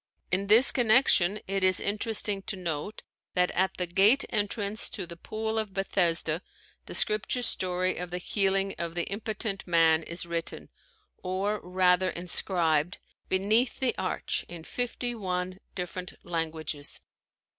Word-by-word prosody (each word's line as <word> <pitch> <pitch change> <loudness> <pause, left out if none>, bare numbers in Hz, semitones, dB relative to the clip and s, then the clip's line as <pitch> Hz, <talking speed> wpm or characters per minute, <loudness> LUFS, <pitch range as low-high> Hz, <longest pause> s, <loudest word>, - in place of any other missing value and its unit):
In 195 +2 +1
this 225 +6 +8
connection 220 -5 +3
it 195 0 -2
is 185 0 +4
interesting 205 -1 +2
to 215 - -2
note 175 +2 -4 0.3
that 180 0 +3
at 190 +1 0
the 180 - 0
gate 200 +10 +4
entrance 205 0 0
to 190 - -5
the 170 0 -9
Pool 220 +5 -3
of 205 -4 -5
Bethesda 170 -4 +1 0.5
the - - -6
scripture 215 +4 +2
story 185 -4 -1
of 180 0 -4
the 180 - -3
healing 195 +1 0
of 170 0 -4
the 175 - 0
impotent 210 -1 -3
man 165 -2 +4
is 170 +2 -4
written, 170 -1 -5 0.5
or 195 +3 -2
rather 180 0 +2
inscribed, 175 -1 0 0.3
beneath 215 +6 +2
the 260 -2 0
arch, - - -2
in 170 -2 -9
fifty 245 +3 -3
one 185 -3 -3 0.2
different 180 0 -5
languages. 160 -3 -3
185 Hz, 140 wpm, -28 LUFS, 175-210 Hz, 0.5 s, this